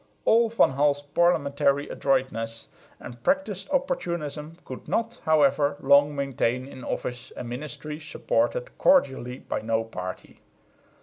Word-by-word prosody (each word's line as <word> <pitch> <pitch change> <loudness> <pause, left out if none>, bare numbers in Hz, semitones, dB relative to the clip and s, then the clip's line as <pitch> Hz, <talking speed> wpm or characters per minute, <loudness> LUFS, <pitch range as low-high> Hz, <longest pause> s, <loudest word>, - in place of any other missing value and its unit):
All 230 +1 +5
Van 230 -10 +4
Hall's 145 +1 +1
parliamentary 145 -3 +2
adroitness 125 -4 -1 0.3
and 120 -1 -10
practised 275 -7 0
opportunism 170 - -2
could 130 - -9
not, 230 +1 -2
however, 145 -2 +3
long 140 +2 +4
maintain 130 -2 -1
in 130 -2 -10
office 125 0 -4
a - - -4
ministry 150 +5 -6
supported - - -1
cordially 130 - +3
by - - -4
no 115 +1 0
party. 95 -5 -8
145 Hz, 120 wpm, -26 LUFS, 130-170 Hz, 0.3 s, All